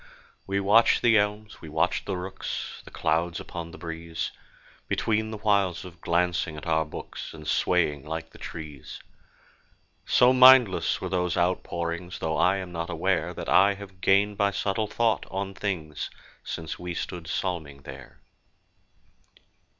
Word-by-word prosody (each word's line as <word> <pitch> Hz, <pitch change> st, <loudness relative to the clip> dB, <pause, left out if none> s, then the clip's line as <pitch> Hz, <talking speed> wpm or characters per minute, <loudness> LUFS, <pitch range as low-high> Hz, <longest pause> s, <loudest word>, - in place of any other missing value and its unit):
We 100 Hz, -, 0 dB
watched 105 Hz, +4 st, +4 dB
the 115 Hz, -1 st, +5 dB
elms, 105 Hz, +1 st, -3 dB
we 80 Hz, -, -9 dB
watched 80 Hz, +3 st, 0 dB
the 95 Hz, -2 st, -1 dB
rooks, 95 Hz, +1 st, -5 dB
The -, -, -11 dB
clouds 80 Hz, +2 st, 0 dB
upon 85 Hz, -1 st, -7 dB
the 90 Hz, -, -11 dB
breeze, 80 Hz, -1 st, -5 dB, 0.6 s
Between 110 Hz, 0 st, 0 dB
the 110 Hz, -, -5 dB
whiles 100 Hz, -5 st, +1 dB
of 85 Hz, -2 st, -12 dB
glancing 85 Hz, -2 st, 0 dB
at 75 Hz, -, -8 dB
our 80 Hz, -1 st, +2 dB
books, 75 Hz, -, -8 dB
And 75 Hz, -1 st, -10 dB
swaying 75 Hz, -6 st, +1 dB
like 80 Hz, +1 st, -5 dB
the -, -, -15 dB
trees. 75 Hz, -5 st, -8 dB, 1.1 s
So 125 Hz, +1 st, +5 dB
mindless 130 Hz, -5 st, +6 dB
were -, -, -3 dB
those 90 Hz, -2 st, 0 dB
outpourings!— 85 Hz, 0 st, -1 dB
Though 80 Hz, -1 st, -2 dB
I 95 Hz, +2 st, +4 dB
am 95 Hz, -2 st, -6 dB
not 85 Hz, -1 st, -4 dB
aware -, -, 0 dB
That -, -, -6 dB
I 100 Hz, +1 st, +5 dB
have 95 Hz, -2 st, -12 dB
gained 100 Hz, +2 st, +3 dB
by 100 Hz, 0 st, +4 dB
subtle 100 Hz, +2 st, -1 dB
thought 115 Hz, 0 st, 0 dB
on 95 Hz, 0 st, -3 dB
things 85 Hz, -8 st, -3 dB, 0.3 s
Since 80 Hz, -1 st, -5 dB
we 90 Hz, -1 st, -5 dB
stood 85 Hz, -1 st, -5 dB
psalming 80 Hz, -5 st, -3 dB
there. 65 Hz, -1 st, -11 dB
90 Hz, 150 wpm, -27 LUFS, 80-100 Hz, 1.1 s, mindless